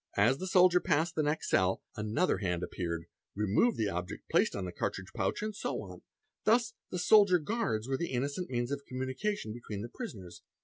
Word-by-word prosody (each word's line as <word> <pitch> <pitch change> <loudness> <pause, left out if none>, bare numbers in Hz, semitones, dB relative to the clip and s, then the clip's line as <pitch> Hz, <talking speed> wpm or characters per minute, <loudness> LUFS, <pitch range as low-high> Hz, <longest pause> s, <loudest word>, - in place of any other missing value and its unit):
As 120 +7 +4
the 185 - -3
soldier 180 -1 +6
passed 160 0 +1
the 155 - +1
next 150 +1 -1
cell, 95 0 +2
another 110 - +1
hand 90 -3 -1
appeared, 85 -2 -3 0.3
removed 105 - +2
the 105 -2 +1
object 90 -1 -5
placed - - +3
on 100 - -3
the 90 - -4
cartridge 95 +1 -4
pouch, 100 - -1
and 215 -1 -3
so - - -2
on: - - -10 0.4
thus 230 +1 +3 0.2
the 180 - -3
soldier 200 0 +6
guards 165 - -1
were 135 0 0
the 170 - -2
innocent 140 +7 -2
means 120 0 -1
of 140 0 -2
communication 130 - -3
between 105 -3 -6
the 120 - -6
prisoners. 105 - -8
130 Hz, 190 wpm, -31 LUFS, -, 0.4 s, soldier